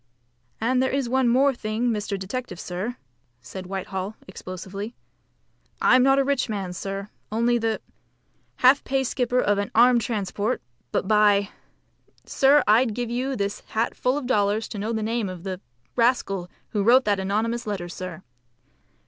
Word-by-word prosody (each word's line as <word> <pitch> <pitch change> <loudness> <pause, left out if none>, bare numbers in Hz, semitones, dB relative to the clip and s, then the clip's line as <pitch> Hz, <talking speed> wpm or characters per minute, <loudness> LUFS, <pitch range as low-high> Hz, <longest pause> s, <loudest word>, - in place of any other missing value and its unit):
"And 250 +3 +2
there 260 - +2
is 275 -2 -1
one 260 +1 +2
more 270 +3 +4
thing, 230 +1 -1
Mr. 205 -2 -2
Detective, 190 0 -5
sir," 195 +8 -4 0.4
said 180 +10 -9
Whitehall 190 +1 -4
explosively. 190 +4 -7 0.8
"I'm 255 - +5
not 270 +1 +5
a 275 - +4
rich 275 -3 0
man, 195 -4 -3
sir, 195 +2 -5 0.2
only 235 +2 +2
the 225 -1 0 0.8
half 260 +3 +5
pay 270 0 0
skipper 250 -1 0
of 205 -4 +2
an 200 - -2
armed 240 +1 +6
transport; 215 +1 -2 0.3
but - - -1
by, 205 -1 +4 0.8
sir, 280 +1 +4
I'd 220 +1 +4
give 240 -1 -3
you 260 +3 -1
this 200 -2 -2
hat 225 +2 -2
full 255 +3 0
of 290 - -4
dollars 210 -3 +1
to 205 - -6
know 215 +3 -2
the 220 -1 -1
name 225 -2 -1
of 180 -2 -8
the 190 -1 -5 0.3
rascal 215 -7 +1 0.2
who 210 - -1
wrote 245 +5 +5
that 205 -2 +2
anonymous 220 +5 -1
letter, 195 -4 -3
sir. 185 0 -7
220 Hz, 160 wpm, -24 LUFS, 195-250 Hz, 0.8 s, armed